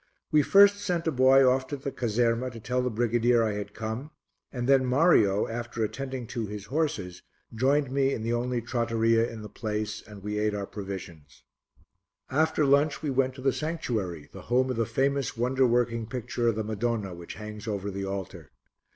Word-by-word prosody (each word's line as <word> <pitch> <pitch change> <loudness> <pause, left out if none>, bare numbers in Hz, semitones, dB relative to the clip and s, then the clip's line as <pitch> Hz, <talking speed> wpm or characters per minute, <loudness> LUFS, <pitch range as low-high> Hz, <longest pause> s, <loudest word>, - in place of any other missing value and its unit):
We 155 -1 +5
first 200 +6 +6
sent 180 -5 -2
a 160 - +1
boy 130 0 +5
off 130 +1 +2
to 145 - -4
the 140 +1 -5
caserma 120 +1 0
to 115 -2 -10
tell 125 +3 -1
the 125 - 0
brigadier 120 +1 +2
I 110 - +1
had 105 0 -5
come, 115 +6 -4 0.4
and 125 -2 -3
then 135 -1 +5
Mario, 125 - +3
after 120 0 -4
attending 130 +2 -4
to 115 -1 -4
his 105 0 -7
horses, 105 - -2 0.3
joined 135 +4 +1
me 135 0 +2
in 110 - -3
the 115 +1 -1
only 120 0 -1
trattoria 115 -1 +1
in 110 -2 -8
the - - -6
place 105 0 -4
and 105 -2 -13
we 105 0 -2
ate 105 -1 0
our 100 -1 -3
provisions. 95 -8 -8 0.9
After 155 +2 +2
lunch 140 +3 +2
we 145 - -1
went 130 0 +1
to 130 - -9
the 135 0 +2
sanctuary, 110 - -3
the - - -9
home 130 +1 +2
of - - -2
the 115 -1 0
famous 140 -2 0
wonder 130 +2 +2
working 115 -1 +1
picture 120 -1 -2
of 115 - +2
the 110 - -2
Madonna 110 -2 -2
which 85 -1 -9
hangs 105 +1 -8
over 100 -1 -3
the 100 0 -4
altar. 95 -2 -6
120 Hz, 195 wpm, -27 LUFS, 105-130 Hz, 0.9 s, first